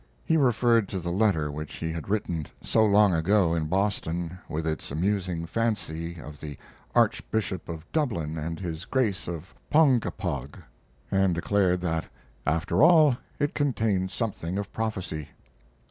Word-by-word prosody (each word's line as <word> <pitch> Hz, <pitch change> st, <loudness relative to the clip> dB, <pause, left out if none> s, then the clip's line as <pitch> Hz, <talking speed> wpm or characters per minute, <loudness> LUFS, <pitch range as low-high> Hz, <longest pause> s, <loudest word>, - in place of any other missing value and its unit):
He 160 Hz, -, +3 dB
referred 120 Hz, -6 st, +3 dB
to 95 Hz, -, -3 dB
the 85 Hz, 0 st, -3 dB
letter 90 Hz, -7 st, +2 dB
which 75 Hz, +1 st, -6 dB
he 80 Hz, 0 st, -3 dB
had 80 Hz, +1 st, -6 dB
written 85 Hz, -7 st, -1 dB, 0.2 s
so 110 Hz, -, +3 dB
long 105 Hz, -2 st, +5 dB
ago 85 Hz, +1 st, +3 dB
in 80 Hz, -2 st, 0 dB
Boston, 90 Hz, -2 st, -1 dB
with 80 Hz, +1 st, -2 dB
its 80 Hz, -1 st, -2 dB
amusing 90 Hz, +1 st, -1 dB
fancy 85 Hz, -6 st, -2 dB
of 75 Hz, -2 st, -10 dB
the 75 Hz, -3 st, -7 dB, 0.4 s
Archbishop 95 Hz, -6 st, +1 dB
of 80 Hz, -1 st, -6 dB
Dublin 100 Hz, -, -1 dB
and 80 Hz, +1 st, -4 dB
his 85 Hz, -2 st, -5 dB
Grace 110 Hz, -7 st, 0 dB
of 85 Hz, +1 st, -6 dB, 0.2 s
Ponkapog, 105 Hz, -, +2 dB, 0.5 s
and 95 Hz, -2 st, +3 dB
declared 90 Hz, 0 st, +2 dB
that, 80 Hz, -2 st, -1 dB, 0.4 s
after 80 Hz, +7 st, +1 dB
all, 155 Hz, -4 st, +7 dB, 0.2 s
it 145 Hz, -, 0 dB
contained 110 Hz, -10 st, +1 dB
something 95 Hz, -5 st, -3 dB
of 100 Hz, -, -4 dB
prophecy. 95 Hz, -9 st, -3 dB
90 Hz, 145 wpm, -27 LUFS, 80-110 Hz, 0.5 s, all